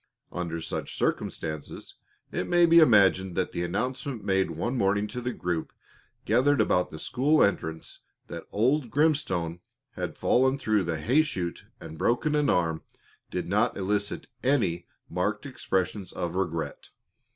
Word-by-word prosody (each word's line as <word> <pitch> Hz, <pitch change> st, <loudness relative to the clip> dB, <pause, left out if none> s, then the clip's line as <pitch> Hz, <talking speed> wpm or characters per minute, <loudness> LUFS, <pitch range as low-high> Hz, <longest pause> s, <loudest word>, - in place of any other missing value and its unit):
Under 85 Hz, -2 st, -3 dB
such -, -, -4 dB
circumstances, 80 Hz, -2 st, -3 dB, 0.4 s
it -, -, -2 dB
may 175 Hz, 0 st, +5 dB
be 170 Hz, 0 st, +7 dB
imagined 95 Hz, -, +5 dB
that 95 Hz, -, -1 dB
the -, -, -3 dB
announcement 125 Hz, +7 st, -3 dB
made 95 Hz, -2 st, +1 dB
one 85 Hz, +11 st, -2 dB
morning 100 Hz, -2 st, +2 dB
to 125 Hz, -, -5 dB
the 125 Hz, +1 st, -2 dB
group 90 Hz, -7 st, -3 dB, 0.5 s
gathered 130 Hz, +5 st, +3 dB
about 90 Hz, -4 st, +2 dB
the 80 Hz, -, -8 dB
school 140 Hz, -, +2 dB
entrance 80 Hz, -5 st, -2 dB, 0.3 s
that 85 Hz, -1 st, -8 dB
old 125 Hz, +5 st, +1 dB
Grimstone 110 Hz, -, +1 dB, 0.3 s
had -, -, -5 dB
fallen 130 Hz, +2 st, +3 dB
through 110 Hz, -7 st, +1 dB
the 85 Hz, -1 st, -1 dB
hay 125 Hz, -, +3 dB
shoot 90 Hz, -, -4 dB
and 80 Hz, -, -10 dB
broken 135 Hz, +6 st, +1 dB
an 150 Hz, -1 st, +2 dB
arm 80 Hz, -2 st, +1 dB, 0.5 s
did 90 Hz, -, -3 dB
not 105 Hz, +6 st, +1 dB
elicit 100 Hz, +1 st, -1 dB, 0.2 s
any 105 Hz, -11 st, +1 dB, 0.2 s
marked 105 Hz, +6 st, -2 dB
expressions 95 Hz, -7 st, -2 dB
of 85 Hz, -2 st, -3 dB
regret. 85 Hz, -4 st, -3 dB
100 Hz, 145 wpm, -27 LUFS, 85-130 Hz, 0.5 s, be